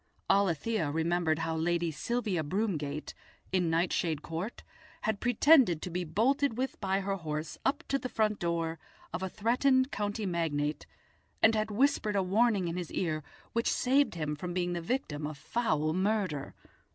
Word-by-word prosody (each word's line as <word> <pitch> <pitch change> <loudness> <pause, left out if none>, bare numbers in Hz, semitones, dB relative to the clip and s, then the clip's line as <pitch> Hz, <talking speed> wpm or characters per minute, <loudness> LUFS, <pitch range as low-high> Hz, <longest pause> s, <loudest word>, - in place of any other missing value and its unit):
Alethia 195 -1 +1
remembered 160 +1 +1
how 160 0 -1
Lady 170 +1 0
Sylvia 215 0 -1
Broomgate, 155 -5 -2 0.4
in 180 -3 +2
Nightshade 165 -2 0
Court, 170 +8 -5 0.4
had 220 -2 -1
pretended 245 - +5
to 180 - -4
be 180 +1 -1
bolted 235 - +1
with 260 -2 -3
by 195 0 +1
her 195 0 -1
horse 155 -2 -4
up 270 - 0
to 275 - +1
the 255 - -4
front 215 -3 +1
door 165 -1 -1 0.3
of - - -3
a 190 - -2
threatened 260 +6 +2
county 205 +1 -2
magnate, 155 -4 -1 0.6
and 220 - +7
had 215 0 0
whispered 215 -2 +2
a 195 - +3
warning 200 0 +2
in 170 +1 -3
his 175 -2 -4
ear 155 -4 -1 0.3
which 230 0 +1
saved 270 -3 +2
him 150 -2 -2
from 175 +3 -5
being 175 -1 0
the 170 - -2
victim 165 - -2
of 155 -1 -7
foul 155 - 0
murder. 185 -6 -1
185 Hz, 165 wpm, -31 LUFS, 160-220 Hz, 0.6 s, and